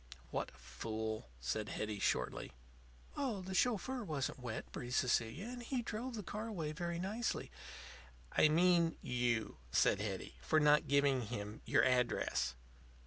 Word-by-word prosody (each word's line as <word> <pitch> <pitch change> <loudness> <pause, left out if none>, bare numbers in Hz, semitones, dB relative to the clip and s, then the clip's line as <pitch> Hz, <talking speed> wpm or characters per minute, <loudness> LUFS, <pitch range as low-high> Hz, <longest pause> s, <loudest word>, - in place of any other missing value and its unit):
"What - - -1
a 70 - -19
fool!" 110 - -4
said 65 - -2
Hetty, 105 -1 -3
shortly. - - 0 0.6
"Oh, 240 -9 -1
the 190 +1 -5
chauffeur 245 +4 +1
wasn't 145 -8 -2
wet," 120 -3 -5
breathed 125 0 -4
Cecilia. 125 - +1
"And 245 +1 -6
he 245 0 -2
drove 235 +3 -4
the 210 - -4
car 210 +5 -4
away 165 -9 -3
very 170 +1 -3
nicely." 205 +7 -2 0.8
"I 155 - +5
mean 170 +1 +4
you," 120 -3 0
said 100 - +4
Hetty. 100 -3 -4
"For 155 - +3
not 150 0 +5
giving 140 -4 +3
him 105 -1 -5
your - - +4
address." 125 - +2
150 Hz, 145 wpm, -37 LUFS, -, 0.8 s, I